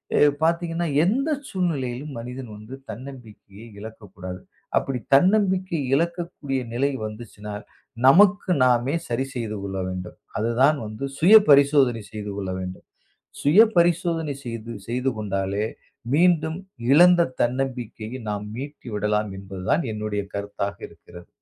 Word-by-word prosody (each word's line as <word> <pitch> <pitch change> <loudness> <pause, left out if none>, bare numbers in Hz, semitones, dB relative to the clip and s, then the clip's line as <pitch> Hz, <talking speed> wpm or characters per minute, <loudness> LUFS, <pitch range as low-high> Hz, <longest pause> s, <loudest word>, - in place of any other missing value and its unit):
எ - - +3 0.3
பாத்தீங்கன்னா, 170 0 0 0.2
எந்த 270 - +1 0.2
சூழ்நிலையிலும் 145 - -2
மனிதன் 125 0 -7
வந்து 110 +5 -11 0.2
தன்னம்பிக்கையை 110 -3 -10
இழக்கக் 110 -2 -11
கூடாது. 90 -1 -7 0.4
அப்படி 130 -2 -1 0.2
தன்னம்பிக்கை 185 0 +2 0.2
இழக்கக்கூடிய 170 -4 -2
நிலை 140 +4 +1
வந்துச்சுன்னா, 105 -1 -8 0.5
நமக்கு 195 +5 +5
நாமே 125 +4 +2
சரி 120 +3 -1
செய்து 110 -3 -3
கொள்ள 95 -1 -4
வேண்டும். 90 -1 -6 0.2
அதுதான் 125 +7 +3
வந்து 110 +6 -5
சுய 190 +7 +7
பரிசோதனை 140 -5 +5
செய்து 105 -1 -5
கொள்ள 95 -2 -3
வேண்டும். 90 0 -7 0.6
சுய 155 +9 +6 0.2
பரிசோதனை 170 -3 +2
செய்து 115 -1 -6 0.2
செய்து 125 +3 0
கொண்டாலே, 100 0 -2 0.5
மீண்டும் 160 0 +3 0.3
இழந்த 175 +2 +7 0.2
தன்னம்பிக்கையை 125 -2 -3
நாம் 105 0 -3
மீட்டி 140 -1 -8
விடலாம். 105 0 0
என்பதுதான் 95 - -2
என்னுடைய 105 -1 -3
கருத்தாக 100 0 -4
இருக்கிறது. 85 0 -15
125 Hz, 120 wpm, -24 LUFS, 105-160 Hz, 0.6 s, சுய